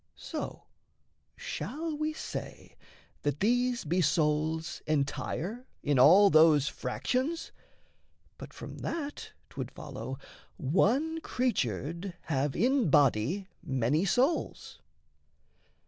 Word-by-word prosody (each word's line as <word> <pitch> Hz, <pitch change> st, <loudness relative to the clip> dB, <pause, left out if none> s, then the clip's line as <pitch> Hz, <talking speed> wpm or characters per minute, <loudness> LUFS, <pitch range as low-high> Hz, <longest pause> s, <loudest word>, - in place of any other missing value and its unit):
So -, -, -6 dB, 0.7 s
shall 310 Hz, +4 st, -4 dB
we 305 Hz, +1 st, -1 dB
say 310 Hz, -, -7 dB, 0.5 s
that 145 Hz, -1 st, -1 dB
these 245 Hz, +2 st, +1 dB
be 175 Hz, +4 st, +1 dB
souls 155 Hz, +1 st, 0 dB
entire 160 Hz, -, -2 dB, 0.2 s
In 145 Hz, -3 st, +2 dB
all 190 Hz, +9 st, +8 dB
those 155 Hz, -2 st, +6 dB
fractions? 275 Hz, -, -2 dB, 0.9 s
but -, -, -9 dB
from -, -, -9 dB
that 295 Hz, -3 st, -5 dB, 0.2 s
'twould -, -, -5 dB
follow 130 Hz, +4 st, -7 dB, 0.4 s
One 260 Hz, -, +1 dB
creature'd 170 Hz, -, -2 dB
have 140 Hz, -2 st, -1 dB
in 255 Hz, -, +2 dB
body 145 Hz, -, +3 dB
many 135 Hz, +5 st, +1 dB
souls. 255 Hz, -, 0 dB
175 Hz, 95 wpm, -30 LUFS, -, 0.9 s, all